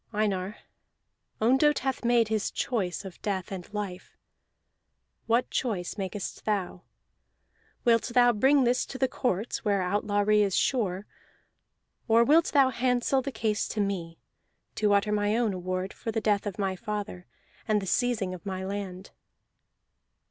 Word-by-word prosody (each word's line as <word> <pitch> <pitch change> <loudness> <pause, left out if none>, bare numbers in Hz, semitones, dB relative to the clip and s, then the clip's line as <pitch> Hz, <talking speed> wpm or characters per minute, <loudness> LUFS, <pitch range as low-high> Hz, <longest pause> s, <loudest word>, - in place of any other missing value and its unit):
Einar, 205 -2 -1 0.8
Ondott 265 +6 +4
hath 265 -2 -2
made 235 -2 +3
his 220 -1 0
choice 215 -10 -2
of 190 - -10
death 195 -3 -3
and 190 0 -7
life; 205 -4 -6 1.1
what 235 +2 +2
choice 200 -9 -2
makest 195 -1 -5
thou? 195 -4 -1 1.0
Wilt 230 -1 +4
thou 245 -1 +6
bring 265 +5 +4
this 245 +1 +2
to 265 - -7
the 265 - +2
courts, 230 -3 -2
where 200 -3 +1
outlawry 205 +2 +2
is 200 -3 +1
sure; 205 -6 0 1.0
or 230 0 +5
wilt 310 +7 +5
thou 275 -3 +4
handsel 250 +2 +1
the 275 +2 -4
case 220 -3 -1
to 215 - -4
me, 180 -5 -2 0.6
to 210 -1 +1
utter 200 +1 +3
my 210 +1 +1
own 230 -4 +1
award 185 +1 -3
for 225 - -5
the 225 - -1
death 210 -1 +1
of 200 - -5
my 195 -2 -1
father 205 -3 -5 0.4
and 215 -1 +3
the 195 - -5
seizing 220 -2 0
of 180 - -9
my 190 -1 -4
land?" 195 -1 -5
210 Hz, 150 wpm, -28 LUFS, 190-240 Hz, 1.1 s, thou